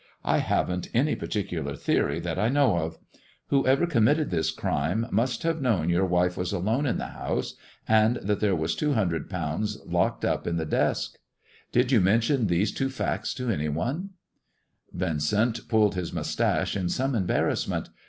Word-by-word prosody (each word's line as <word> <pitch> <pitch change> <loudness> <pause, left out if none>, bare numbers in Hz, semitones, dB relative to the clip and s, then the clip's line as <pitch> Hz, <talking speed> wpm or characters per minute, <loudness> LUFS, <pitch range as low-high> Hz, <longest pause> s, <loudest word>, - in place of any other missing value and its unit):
I - - +3
haven't 90 0 -1
any 140 +6 +3
particular 105 -3 -3
theory - - 0
that 85 -1 -3
I 110 - +2
know 135 -10 +3
of. 80 0 -4 0.5
Whosoever 135 +3 +3
committed 145 - +2
this 80 -3 +1
crime 80 +7 -1
must 120 +5 0
have 165 -2 0
known 95 -10 +1
your 90 +2 +2
wife 90 0 +2
was 90 -1 -2
alone 110 +9 0
in 125 - 0
the - - -3
house, - - -3 0.3
and 110 +2 +4
that 105 -3 -1
there 100 -3 +2
was 80 0 -1
two 150 -1 0
hundred 90 - -1
pounds 90 +4 -2
locked - - 0
up - - -1
in 85 - 0
that 80 -2 -3
desk. - - 0 0.5
Did 125 +2 +2
you 120 -6 +5
mention 115 +5 +2
these 90 +4 +1
two 135 -1 -1
facts 135 - -2
to 125 -2 -2
any 75 -6 -1
onel" 130 - -2 0.9
Yincent 100 +7 0
pulled 110 -3 +3
his 90 -2 -3
moustache - - 0
in 90 -3 -1
some 135 +6 0
embarrassment. 95 -7 0
105 Hz, 170 wpm, -26 LUFS, 85-125 Hz, 0.9 s, you